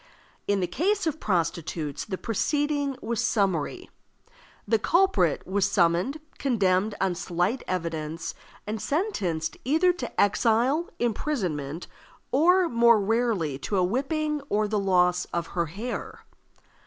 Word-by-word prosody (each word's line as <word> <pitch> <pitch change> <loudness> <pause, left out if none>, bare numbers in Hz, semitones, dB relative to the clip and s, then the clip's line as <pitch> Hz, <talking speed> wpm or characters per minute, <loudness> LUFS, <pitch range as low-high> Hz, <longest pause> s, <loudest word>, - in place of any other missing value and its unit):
In 200 -1 +1
the - - +2
case 375 - 0
of 315 -1 -1
prostitutes 165 -5 -2
the 190 - -4
proceeding 285 +5 -1
was 235 -1 -1
summary. 200 - 0 0.8
The 225 +1 +3
culprit 335 - +2
was 195 +1 +1
summoned, 180 - +2 0.2
condemned 205 -5 +1
on 190 -2 +1
slight 180 +7 -1
evidence, 165 -2 -3 0.3
and 215 0 -4
sentenced 190 - -1
either 325 +7 +3
to 255 -9 -6
exile, 235 - +2
imprisonment, 180 - -2 0.5
or, 355 +7 +4
more 235 -4 +5
rarely, 205 - 0
to 200 +7 -2
a 185 - +3
whipping 295 - -1
or 210 +1 +1
the 210 0 0
loss 180 -2 +2
of 170 -1 -3
her 170 -2 0
hair. 210 +10 -6
210 Hz, 125 wpm, -26 LUFS, 180-280 Hz, 0.8 s, more